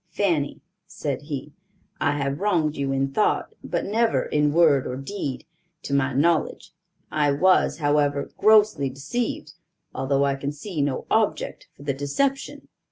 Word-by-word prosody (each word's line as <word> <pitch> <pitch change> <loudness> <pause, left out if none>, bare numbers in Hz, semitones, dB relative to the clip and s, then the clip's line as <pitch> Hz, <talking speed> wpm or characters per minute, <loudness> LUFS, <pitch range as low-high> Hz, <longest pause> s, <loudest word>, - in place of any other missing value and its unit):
"Fanny," 165 -8 -1 0.3
said 140 -4 -4
he, 145 0 -5 0.5
"I 145 - +1
have 140 +1 -2
wronged 170 -7 +1
you 140 -1 -2
in 135 0 0
thought, 210 - +1
but - - -2
never 225 +3 +1
in 150 0 +1
word 150 -4 +4
or 125 - -4
deed, 135 0 -5 0.4
to 140 - -4
my 140 0 +2
knowledge. 155 +5 0 0.4
I 150 -1 +2
was, 185 +6 +3
however, 145 -1 +1
grossly 210 -9 +4
deceived, 185 - -4 0.4
although 135 +1 +1
I 140 - +1
can 140 +1 -4
see 155 +1 -4
no 140 -2 -1
object - - 0
for - - -14
the 140 -1 -1
deception." 265 - -2
145 Hz, 150 wpm, -24 LUFS, 140-175 Hz, 0.5 s, word